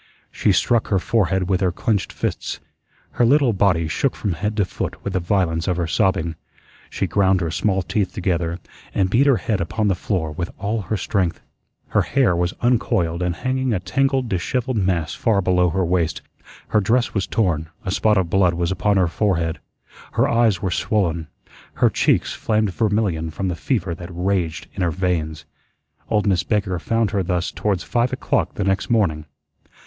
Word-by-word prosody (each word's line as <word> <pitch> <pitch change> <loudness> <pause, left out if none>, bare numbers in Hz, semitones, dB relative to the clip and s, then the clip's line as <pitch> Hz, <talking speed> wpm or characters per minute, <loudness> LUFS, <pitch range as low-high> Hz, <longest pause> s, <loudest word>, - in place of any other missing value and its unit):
She - - +1
struck 120 -2 +2
her 100 - +2
forehead 95 -2 +1
with 95 0 +1
her 95 -2 +2
clenched 105 +2 -1
fists. - - -3 0.5
Her - - +1
little 135 0 +4
body 90 -5 +2
shook 130 - 0
from 100 -4 -2
head 105 +6 -3
to 100 - +3
foot - - -5
with - - -3
the 95 - +1
violence 85 -3 0
of 90 -2 0
her 85 - 0
sobbing. 90 -1 +1 0.6
She - - -2
ground 95 -2 +2
her 85 -3 -2
small 95 +3 0
teeth 95 0 -1
together 85 -4 -1 0.4
and 95 -1 +1
beat 135 +6 +4
her 135 -4 +5
head 105 -3 -1
upon 110 -2 0
the - - +3
floor 90 -3 -2
with 85 +3 -4
all 105 +2 -2
her 105 +3 -2
strength. 95 -5 -1 0.5
Her - - +3
hair 130 -10 +2
was 90 +1 -1
uncoiled 110 -8 +1
and 90 -1 0
hanging 130 +1 -1
a 100 - 0
tangled, 130 +8 0
dishevelled 120 +6 -1
mass 90 -6 0
far 110 -3 +1
below 90 -1 +2
her 95 +3 0
waist; 85 -2 0 0.5
her 105 - +3
dress 120 +5 +1
was 95 -3 -1
torn; 80 -8 0 0.2
a 95 - -1
spot 105 +1 +2
of 95 -3 +2
blood 90 -1 +2
was 85 0 -1
upon 100 +2 +1
her 90 -2 +3
forehead; 85 -3 0 0.5
her - - +3
eyes 115 -6 +2
were 95 - 0
swollen; 85 -5 0 0.5
her - - +3
cheeks - - +2
flamed 110 -3 0
vermilion 100 -7 0
from 95 +4 -3
the 90 - -2
fever 85 - -1
that 85 +1 -8
raged 90 -2 -1
in 95 - -5
her 90 - +2
veins. 80 -3 -2 0.6
Old 105 -1 +1
Miss 95 -3 +2
Baker 95 -3 -1
found 115 -1 0
her 100 -3 +1
thus 90 0 -1
towards 100 -4 -1
five 120 0 0
o'clock - - -1
the 100 - -1
next 95 0 0
morning. 80 -10 +1
95 Hz, 185 wpm, -21 LUFS, 85-110 Hz, 0.6 s, her